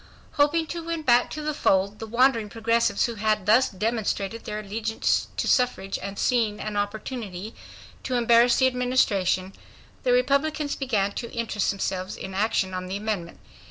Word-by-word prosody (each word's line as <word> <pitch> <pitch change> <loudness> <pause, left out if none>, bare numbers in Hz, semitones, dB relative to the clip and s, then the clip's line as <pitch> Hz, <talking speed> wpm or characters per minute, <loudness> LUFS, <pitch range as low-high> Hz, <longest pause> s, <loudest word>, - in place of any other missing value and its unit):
Hoping 295 +3 +2
to 340 - -4
win 330 -1 -3
back 245 -2 +4
to 305 - -6
the 305 0 -1
fold 200 -6 +1
the 225 - -6
wandering 235 -2 +2
Progressives 230 +2 +1
who 235 - -3
had 215 -3 +1
thus 225 +6 +5
demonstrated 215 +1 -2
their 210 - -4
allegiance 220 +2 -1
to - - -1
suffrage 245 -6 +1
and 200 0 -6
seeing 225 -4 +1
an 215 -1 -4
opportunity 205 -1 -4 0.5
to 255 - -3
embarrass 235 0 +5
the 260 - +3
Administration, 210 -7 +1 0.5
the, - - +1
Republicans 310 - +1
began 215 -8 0
to 235 +3 -6
interest 225 -4 -1
themselves 190 -1 -3
in 190 - -7
action 195 -1 0
on 185 0 -4
the 190 +2 -3
amendment. 205 -5 -4
225 Hz, 160 wpm, -25 LUFS, 200-250 Hz, 0.5 s, thus